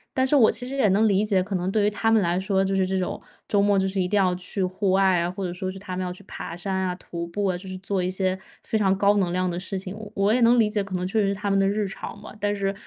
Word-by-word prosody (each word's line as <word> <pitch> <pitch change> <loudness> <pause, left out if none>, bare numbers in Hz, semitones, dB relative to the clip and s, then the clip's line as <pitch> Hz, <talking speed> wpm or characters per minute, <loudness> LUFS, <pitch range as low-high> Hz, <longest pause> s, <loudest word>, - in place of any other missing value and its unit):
但 260 - +3
是 280 +3 +2
我 235 -6 +6
其 245 - -3
实 270 - -5
也 265 -6 +3
能 205 +4 +3
理 200 0 +3
解， 195 -4 +2
可 200 +1 -6
能 185 +1 -1
对 210 0 +2
于 210 - +2
他 225 +2 0
们 225 0 +5
来 175 +1 +1
说 190 0 +1
就 195 - -1
是 190 -1 +2
这 190 0 -1
种 185 - -3 0.3
周 200 -1 +2
末 205 0 +3
就 190 0 +2
是 190 0 -1
一 180 - 0
定 205 +3 +1
要 185 -2 +3
去 180 +2 -3
户 185 +2 -1
外 190 -1 +4
啊， 170 +1 0
或 190 +1 -4
者 175 - -3
说 185 +1 -4
是 190 - -8
他 190 -1 -6
们 185 - -2
要 180 - -3
去 190 +3 -10
爬 170 - -7
山 190 +2 -3
啊， 185 -1 -1
徒 170 -2 -6
步 200 +4 -2
啊， 185 -2 +1
就 185 +2 -7
是 185 - -5
做 195 0 -2
一 180 - -1
些 185 0 0 0.3
非 220 - 0
常 195 -1 +2
高 200 +1 +4
能 180 -3 +1
量 185 +1 0
的 175 0 -3
事 185 +1 -4
情， 185 +1 -6 0.2
我 200 +2 +2
也 245 - +2
能 235 +1 +5
理 220 - +4
解， 210 -2 0
可 195 -1 -6
能 180 0 -2
确 215 +4 +1
实 200 - +2
是 200 - 0
他 205 0 -2
们 195 - +3
的 195 0 +3
日 205 0 0
常 205 +1 -8
吧。 210 - -11
但 205 0 0
是 195 -1 -1
195 Hz, 360 characters per minute, -24 LUFS, 185-205 Hz, 0.3 s, 我